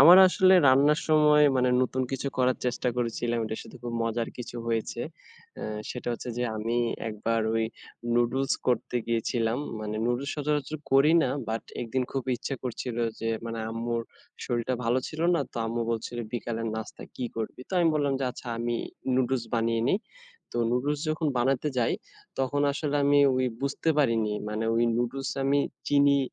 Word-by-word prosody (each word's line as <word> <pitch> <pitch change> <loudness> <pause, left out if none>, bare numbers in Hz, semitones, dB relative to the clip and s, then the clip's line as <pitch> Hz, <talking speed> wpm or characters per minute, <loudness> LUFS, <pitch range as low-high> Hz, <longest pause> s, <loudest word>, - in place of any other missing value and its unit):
আমার 170 +6 +10
আসলে 185 +1 +5
রান্নার 145 +4 +5
সময় 150 -1 +6
মানে 125 0 +3
নতুন 130 +1 0
কিছু 135 +1 -2
করার 130 0 +3
চেষ্টা 125 0 0
করেছিলাম। 120 0 -1
এটার 110 0 -4
সাথে - - -12
খুব 120 -1 -4
মজার 115 0 -1
কিছু 120 0 -6
হয়েছে। 115 -1 -1 0.6
অ্যা - - -5 0.2
সেটা 125 -1 -5
হচ্ছে 120 - -6
যে 125 - +1
আমি 115 +2 -1 0.3
একবার 115 +2 -1
ওই 115 0 +2 0.5
নুডলস 120 +3 +2
করতে 125 0 +1
গিয়েছিলাম, 115 +1 0 0.2
মানে 105 0 -3
নুডলস 120 +4 0
সচরাচর 150 0 -1
করি 140 +4 +6
না 125 - +1 0.2
বাট 110 0 -2 0.2
একদিন 120 +2 -1
খুব 135 -2 -1
ইচ্ছা 135 - -4
করছিল 120 -1 -4 0.2
যে 115 - -1 0.2
মানে 115 0 -4
আম্মুর 115 +1 -2 0.4
শরীরটা 120 +1 -1
ভালো 120 +3 +2
ছিল 155 - -7
না। - - +2
তো - - -11
আম্মু 115 +1 -1
বলছিল 115 +1 -3 0.2
বিকালের 115 -1 -3
নাস্তা 110 - -7
কী 125 - -3
করবি? 115 +2 -4
তো - - -13
আমি 170 -1 +4
বললাম 145 -2 +1
যে - - +1
আচ্ছা 125 - -9
আমি, 120 0 -1 0.4
নুডলস 130 -1 +1
বানিয়ে 115 0 +1
নেই। 195 - +3 0.5
তো - - -5
নুডলস 140 +4 0
যখন 155 +1 0
বানাতে 135 +4 +1
যাই 115 - +2 0.5
তখন 135 +2 0
আসলে 145 0 -1
আমি 145 0 +5 0.2
ওই 130 0 +2 0.2
বুঝতে 140 +3 -1
পারিনি, 115 -6 +2 0.2
মানে 110 +1 -2
ওই 115 - +3
নুডলসে 130 +3 -2
আমি 140 +1 +3 0.3
চিনি 140 -1 +5
125 Hz, 170 wpm, -28 LUFS, 115-140 Hz, 0.6 s, আমার